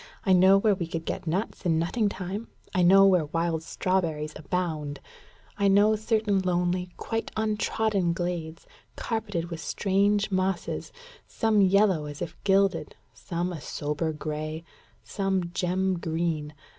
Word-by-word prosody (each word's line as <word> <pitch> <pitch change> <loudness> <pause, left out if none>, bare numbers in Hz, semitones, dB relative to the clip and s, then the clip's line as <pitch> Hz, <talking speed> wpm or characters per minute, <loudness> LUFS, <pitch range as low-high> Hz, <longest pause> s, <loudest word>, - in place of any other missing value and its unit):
I 190 - +4
know 190 +2 +6
where 210 +1 +3
we 180 -4 -3
could 165 -1 -5
get - - -4
nuts 190 +8 -2
in 165 -3 +2
nutting 205 +6 +1
time; 195 +3 -5 0.3
I 185 - +2
know 195 +3 +7
where 180 -5 +4
wild 165 +1 -1
strawberries 160 -4 -1
abound; 155 -3 -3 0.6
I 200 - +3
know 205 +2 +5
certain 215 -2 +1
lonely, 180 0 0
quite 225 0 -3
untrodden 215 -3 0
glades, 170 -2 -4 0.3
carpeted 205 -7 -3
with 165 - -5
strange 200 +3 +1
mosses, 185 -1 -1 0.4
some 220 -2 +2
yellow 190 -4 +3
as 145 0 -8
if 170 -1 -5
gilded, 195 0 +2 0.2
some 175 0 -3
a 160 - -7
sober 150 +3 -2
gray, 155 +1 -5 0.4
some 190 -3 -1
gem 185 0 0
green. 160 -2 -2
180 Hz, 140 wpm, -27 LUFS, 165-200 Hz, 0.6 s, know